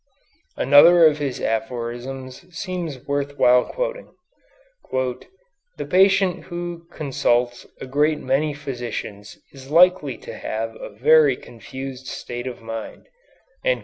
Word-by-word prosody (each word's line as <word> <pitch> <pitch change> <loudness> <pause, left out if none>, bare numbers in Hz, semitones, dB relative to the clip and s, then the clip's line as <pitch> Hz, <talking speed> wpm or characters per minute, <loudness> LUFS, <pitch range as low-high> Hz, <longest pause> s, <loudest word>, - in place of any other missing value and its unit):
Another 165 +5 +7
of 150 -1 +4
his 140 -3 -3
aphorisms 125 +6 -4
seems 175 -9 -5
worth 140 0 -2
while 125 0 +5
quoting: - - -4 0.8
"The 385 - -6
patient 190 -1 +3
who 175 -1 -6
consults 125 -5 0
a - - -6
great 150 +4 +1
many 145 +2 0
physicians 120 -7 -6 0.2
is 135 -1 -12
likely 170 -4 +4
to - - -10
have 115 +1 -4
a - - -8
very 145 +6 +4
confused 130 +3 -9
state 120 +1 -6
of 120 -2 -7
mind." 115 0 -7
140 Hz, 115 wpm, -22 LUFS, 125-170 Hz, 0.8 s, Another